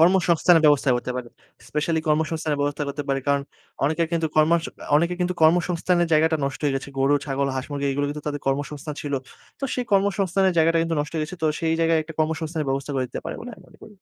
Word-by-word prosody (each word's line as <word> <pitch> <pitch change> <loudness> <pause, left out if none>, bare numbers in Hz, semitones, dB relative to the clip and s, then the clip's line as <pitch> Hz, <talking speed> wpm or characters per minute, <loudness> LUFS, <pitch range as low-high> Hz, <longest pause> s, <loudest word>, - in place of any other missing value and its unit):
কর্মসংস্থানের 170 -1 +4
ব্যবস্থা 145 -2 +4
করতে 120 +1 -4
পারে। 125 -2 -5 0.4
স্পেশালী 150 +4 0
কর্মসংস্থানের 155 -1 0
ব্যবস্থা 145 +1 -1
করতে 140 +1 -4
পারে। 135 0 +1
কারণ 140 0 +2 0.4
অনেকে 155 +4 +1
কিন্তু 165 -1 +1
কর্মসং 160 +1 +3 0.3
অনেকে 170 +3 +1
কিন্তু 180 0 0
কর্মসংস্থানের 175 +1 +3
জায়গাটা 160 +1 +4
নষ্ট 135 0 -5
হয়ে 140 -2 +1
গেছে। 135 - -6
গরু, 135 +2 +4
ছাগল 140 0 0
হাঁস 130 - -3
মুরগি 140 -1 -2
এগুলো 145 +1 0
কিন্তু 150 0 -6
তাদের 145 -1 -4
কর্মসংস্থান 145 +2 -2
ছিল। 145 - -4 0.5
তো - - -2
সেই 250 - -2
কর্মসংস্থানের 195 -1 +2
জায়গাটা 165 +1 +4
কিন্তু 165 0 -1
নষ্ট 150 - -5
হয়ে 160 - 0
গেছে। 160 +4 -8
তো - - +3
সেই 160 -1 +1
জায়গায় 165 0 +3
একটা 160 +1 -10
কর্মসংস্থানের 155 0 -1
ব্যবস্থা 135 +1 -2
করে 130 -1 0
দিতে - - -6
পারে - - -4
বলে 245 - -7
আমি - - -17
মনে - - -20
করি। - - -12
155 Hz, 215 wpm, -24 LUFS, 145-170 Hz, 0.5 s, কর্মসংস্থানের